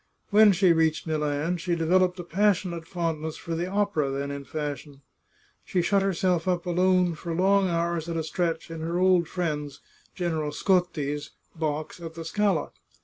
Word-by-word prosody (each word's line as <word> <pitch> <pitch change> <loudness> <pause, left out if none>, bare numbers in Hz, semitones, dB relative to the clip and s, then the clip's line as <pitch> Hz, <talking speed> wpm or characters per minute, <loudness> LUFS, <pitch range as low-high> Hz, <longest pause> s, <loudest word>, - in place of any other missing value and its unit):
When 210 0 +7
she 185 -2 +4
reached 160 -1 +1
Milan 155 +2 -1
she 175 0 -1
developed 180 +2 +2
a - - -4
passionate 180 -3 0
fondness 160 -3 -3
for 170 - -5
the 170 +2 -2
opera 195 -7 0
then 140 +1 -3
in 140 0 -6
fashion. 145 -1 -5 0.6
She 180 - 0
shut 195 +2 +2
herself 185 -2 0
up 180 -1 0
alone 180 0 +2
for 165 +1 -5
long 195 +2 +3
hours 170 -1 -1
at 165 - -2
a 160 - -1
stretch 165 0 -2
in 165 - -6
her 165 +2 -2
old 180 -2 +4
friend's, 150 -5 -3 0.4
General 160 -5 -2
Scotti's, 150 -6 0 0.3
box 155 0 -3
at 165 -1 -8
the 165 -1 -7
Scala. 195 -2 0
170 Hz, 165 wpm, -26 LUFS, 155-185 Hz, 0.6 s, When